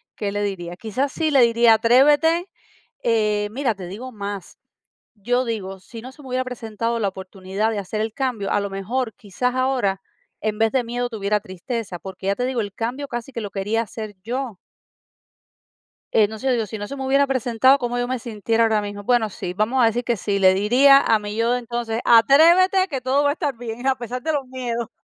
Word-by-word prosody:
qué 200 -1 -3
le 205 0 -2
diría. 175 -3 -4
Quizás 255 +7 -2
sí 315 -1 -1
le 270 -3 +5
diría: 235 -1 +5
"Atrévete". 295 - +4 0.5
Eh, 210 -2 +1
mira, 250 -3 -1
te 185 -2 -8
digo 240 +8 -7
más, 200 -3 -7 0.6
yo 245 +5 0
digo, 195 -4 -4
si 225 +4 -11
no 255 +2 -9
se 295 - -16
me 265 - -11
hubiera 255 +1 0
presentado 230 -1 -3
la 200 -2 +1
oportunidad 190 +3 -3
de 210 - -2
hacer 205 +2 -4
el 220 0 -2
cambio, 245 -7 -2
a 205 - +2
lo 200 - -3
mejor, 220 +4 -3
quizás 250 +5 -3
ahora, 250 -8 0 0.4
en 210 -1 -2
vez 225 0 +3
de 260 -2 +1
miedo 245 +1 -2
tuviera 210 -2 -1
tristeza, 195 -1 -5
porque 190 0 -8
ya 200 - +2
te 250 - -1
digo, 255 -3 -1
el 205 -1 -5
cambio 255 +5 -4
casi 240 +2 -5
que 230 - -4
lo 205 - -6
quería 210 +3 -1
hacer 215 -2 -7
yo. 245 -2 -4 1.6
Eh, 210 -2 +5
no 220 +1 -8
sé, 265 +3 0
digo, 230 -3 0
si 220 - -6
no 205 0 -5
se 280 - -6
me 270 - -5
hubiera 275 +1 +4
presentado, 260 +1 +3
¿cómo 245 -1 -2
yo 245 0 -1
me 255 -1 -2
sintiera 225 0 -1
ahora 215 -2 +1
mismo? 205 0 -6
Bueno, 225 -2 +2
sí, 180 - -5
vamos 235 +5 +1
a 230 - +6
decir 240 +2 -1
que 235 -1 0
sí, 200 +1 -2
le 190 -1 +5
diría 255 +8 +6
a 225 - +3
mi 210 0 -6
yo 230 +1 +1
de 250 - 0
entonces: 235 -1 -3
"Atrévete, 335 +11 +6
que 270 -6 -4
todo 270 +3 +1
va 285 - +3
a - - 0
estar 290 -7 -3
bien, 240 +2 -5
a 265 - +3
pesar 245 +1 -5
de 315 - -1
los 285 -3 -1
miedos". 245 -3 -4
230 Hz, 220 wpm, -22 LUFS, 205-255 Hz, 1.6 s, a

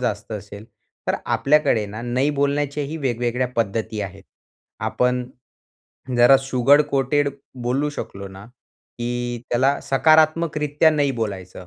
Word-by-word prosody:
जास्त 110 -2 -3
असेल. 105 0 -8 0.4
तर - - +2
आपल्याकडे 140 -7 +2
ना, 105 +2 -7
नाही 125 +4 0
बोलण्याच्याही 145 +1 -1
वेगवेगळ्या 125 -3 -1
पद्धती 110 0 -1
आहेत. 100 0 -8 0.6
आपण 125 0 0 0.9
जरा 120 +3 +7
शुगर 135 +2 +4
कोटेड 140 +2 +1 0.3
बोलू 135 +5 0
शकलो 100 -8 -7
ना, 95 +1 -12 0.5
की 120 0 -3
त्याला 130 +4 +2
सकारात्मकरित्या 155 +1 +3
नाही 145 -3 +1
बोलायचं, 95 -4 -5
125 Hz, 115 wpm, -22 LUFS, 115-145 Hz, 0.9 s, जरा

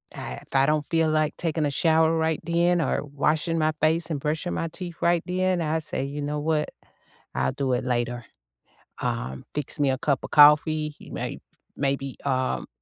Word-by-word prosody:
I 65 - -5
if - - -12
I 135 0 +5
don't 150 -1 +1
feel 165 -1 +2
like 155 -1 +1
taking 160 -2 -1
a 145 - 0
shower 160 +2 +3
right 160 -1 0
then 170 +1 +2
or - - 0
washing 155 +4 0
my 155 0 +2
face 160 +2 +2
and 150 -3 -2
brushing 155 +4 -2
my 165 - -2
teeth 175 +1 -6
right 170 -1 +2
then, 185 -1 +1
I 160 0 0
say, 150 -3 -3
"You 145 +2 -4
know 150 +1 -2
what? 150 0 0 0.7
I'll - - +1
do 135 -2 -1
it 125 - 0
later." 120 -1 -1 0.8
Um, 115 - -3
fix 150 +2 -3
me 140 -2 +3
a 130 - +1
cup 140 -1 0
of - - -7
coffee. 150 0 +5 0.2
May - - -4 0.4
maybe, 135 -1 -1
um, 130 -1 0
150 Hz, 185 wpm, -25 LUFS, 140-160 Hz, 0.8 s, I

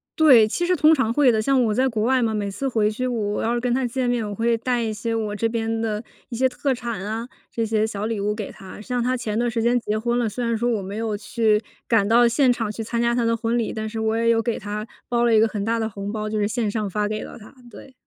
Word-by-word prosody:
对， 260 -9 +7
其 345 +10 -1
实 365 - +3
通 310 0 +5
常 250 -6 +1
会 265 -1 +4
的。 220 - +1
像 260 +2 +3
我 215 -2 +1
在 260 +4 +2
国 220 -4 -1
外 255 +2 +3
嘛， 225 -1 +1
每 205 -1 -2
次 270 +7 -3
回 215 -3 +1
去 255 +4 -2
我 210 -4 -2
要 235 +2 0
是 - - 0
跟 245 0 0
她 260 +1 0
见 250 +1 -2
面， 240 -3 0
我 205 - -5
会 230 +2 +1
带 240 +1 -1
一 220 -1 -2
些 230 +1 -3
我 215 -2 -2
这 225 +2 0
边 225 -1 -2
的 215 -1 -2 0.3
一 235 - -5
些 260 +1 +3
特 265 +1 -1
产 235 -5 -5
啊， 220 +3 -4 0.2
这 230 - -1
些 220 0 +1
小 210 -1 -4
礼 225 -2 -2
物 210 +1 0
给 210 -3 -5
她。 195 0 -11
像 245 +3 -2
她 255 +1 0
前 220 -2 -3
段 240 0 +1
时 230 0 -1
间 245 +1 +3
结 215 -1 -2
婚 240 +2 0
了， 230 -3 0
虽 245 +3 -3
然 230 0 0
说 240 +2 0
我 220 -4 0
没 200 +3 -6
有 220 -2 -2
去 215 0 +1 0.3
赶 210 -4 +3
到 235 +2 +5
现 250 +2 +3
场 225 -3 -3
去 225 +1 -5
参 235 +1 -2
加 235 0 +2
她 240 -1 +1
的 230 0 +2
婚 230 +1 -1
礼， 230 - -1
但 220 0 -4
是 225 0 -5
我 220 0 0
也 230 0 +2
有 230 - +4
给 235 - -1
她 210 +1 -5 0.2
包 240 0 +1
了 235 - +3
一 220 - +6
个 225 - +4
很 205 -2 -4
大 230 +1 0
的 220 - -1
红 200 -1 -6
包， 215 -1 -3
就 215 - -2
是 205 -1 +1
线 220 -1 -1
上 210 -1 -2
发 210 +2 -1
给 215 0 -3
了 - - -10
她， 215 - -14 0.2
对。 260 +5 -13
225 Hz, 320 characters per minute, -23 LUFS, 215-240 Hz, 0.3 s, 对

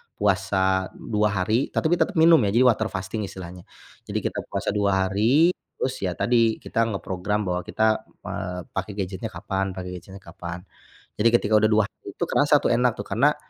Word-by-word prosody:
puasa 95 -1 +1
2 105 -1 -1
hari, 110 +8 0
tetapi 170 +2 +2
tetap - - +1
minum 165 0 +6
ya 100 - 0
jadi 120 - +4
water 110 -1 +1
fasting 95 +3 -3
istilahnya. 90 -2 -9 0.4
Jadi - - -2
kita - - -3
puasa - - -3
2 100 -2 +1
hari. 120 - +4 0.3
Terus 130 0 -1
ya 90 - -1
tadi, 115 +4 +2
kita 115 - 0
ngeprogram 95 +2 -2
bahwa 90 -2 -1
kita, 110 0 +1 0.2
eee, 90 0 -4
pake 95 +2 -4
gadgetnya 95 +1 -4
kapan 95 0 -3
pake 90 0 -6
gadgetnya 95 +2 -12
kapan. 85 0 -8 0.6
Jadi 115 - +5
ketika 110 -2 -2
udah 110 - +4
2 110 0 +4
hari, - - -16
tuh, - - 0
kerasa, - - +3
tuh, - - +3
enak, 120 -1 +2
tuh, - - -5
karna, 145 +6 +2
100 Hz, 180 wpm, -24 LUFS, 95-115 Hz, 0.6 s, minum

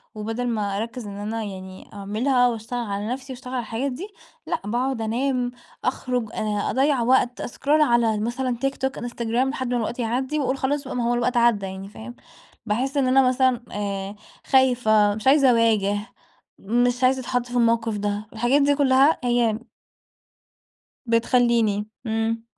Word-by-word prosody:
وبَدَل 225 +3 -3
ما 205 -4 -1
أركّز 230 0 -5
إن 200 0 -7
أنا 220 +2 -3
يعني 190 -2 -9
أعملها 240 +6 +1
وأشتغل 235 +1 -3
على 200 +1 -3
نفسي 260 +2 -5
وأشتغل 255 +1 -9
على 250 - 0
الحاجات 240 +5 -3
دي، 355 +11 -6 0.4
لأ - - -2
باقعد 245 +2 -1
أنام 245 +2 -1 0.3
أخرُج 250 -3 -1
أ 210 -1 -1
أضيّع 270 -1 +2
وقت، 245 0 +2
أسكرول 290 +5 +1
على 235 -5 +3
مثلًا 240 +2 -2
TikTok 270 0 -2
Instagram 240 +1 -1
لحد 260 -3 -3
ما - - +2
الوقت 235 +2 -3
يعدّي 255 +6 -1
وأقول 270 -1 0
خلاص 280 +2 -1
بقى 260 - -6
ما 245 - -1
هو 240 - +2
الوقت 240 +1 0
عدّى 235 -4 +3
يعني، 190 +1 -7
فاهم، 240 +3 -10 0.5
باحس 255 +6 -1
إن 265 -2 +2
أنا 260 0 +5
مثلًا 255 -1 +2
آآ، 200 -1 -4 0.3
خايفة، 225 -6 +3
مش 220 +4 -4
عايزة 275 -1 +6
أواجه، 220 -4 +3 0.6
مش 245 +4 +1
عايزة 260 +1 +4
أتحَطّ 245 -1 -1
في 245 0 -8
الموقف 230 -2 +2
ده، 205 +1 -3
الحاجات 245 +6 +2
دي 285 0 +3
كُلّها 275 +2 +4
هي 240 -2 +1 1.5
بتخليني، 230 -3 +2 0.2
إمم. 225 +1 -1
240 Hz, 160 wpm, -23 LUFS, 220-260 Hz, 1.5 s, عايزة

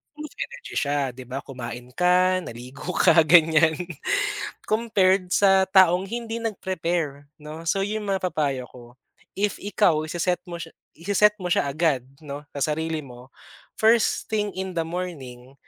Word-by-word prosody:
full 305 0 -7
of 275 - -11
energy 135 +1 -7
siya, 140 -2 0
'di 130 0 -11
ba, 135 +3 -5
kumain 125 -1 -8
ka, 180 +2 +3
naligo 125 +5 -9
ka, 165 - +6
ganyan, 160 -1 +5 0.9
compared 195 -4 +2
sa 195 -1 +5
taong 185 -1 +5
hindi 230 +2 -4
nag-prepare, 170 -8 -2 0.2
'no, 155 +2 -9
so, 195 +4 +1
'yon 210 +1 -2
mapapayo 155 -9 -1
ko. 120 -1 -15 0.4
If 205 +1 -1
ikaw, 180 -6 +2
ise-set 175 +2 -1
mo 170 -1 -7
siya 165 - -9 0.2
i-se-set 205 +5 +3
mo 180 - 0
siya - - +2
agad, 140 -4 0 0.2
'no, 140 0 -6 0.2
sa 150 +2 0
sarili 160 0 -3
mo, 125 0 -13 0.5
first 225 0 +2
thing 210 -1 +1
in 190 0 -4
the 170 - -1
morning, 135 -8 -6
170 Hz, 150 wpm, -24 LUFS, 140-190 Hz, 0.9 s, ka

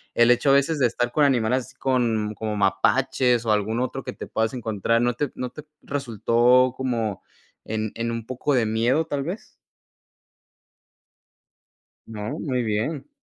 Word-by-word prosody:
el 120 +1 +5
hecho 125 +3 +3
a - - +6
veces 140 +3 +2
de 130 - +4
estar 120 +1 -2
con 150 - +2
animales 125 -2 +2
así 130 - -17
con 115 -5 0
como 110 0 -3
mapaches 120 +4 +2
o 110 - +1
algún 105 +2 0
otro 130 +1 -3
que - - -6
te - - -8
puedas 110 0 -1
encontrar, 115 -1 0
¿no 120 0 +2
te 140 +3 -2
no 125 - -4
te 150 - -10 0.2
resultó 125 -1 +2
como 115 -6 -2 0.4
en 110 -1 -3
en 115 +1 -2
un 115 -1 -4
poco 130 +4 -2
de 120 -3 +2
miedo, 120 +8 +1
tal 145 -3 -3
vez? 180 +9 -7 2.5
¿No? 110 +6 -5
Muy 130 -5 -1
bien. 115 - -2
120 Hz, 165 wpm, -24 LUFS, 110-130 Hz, 2.5 s, a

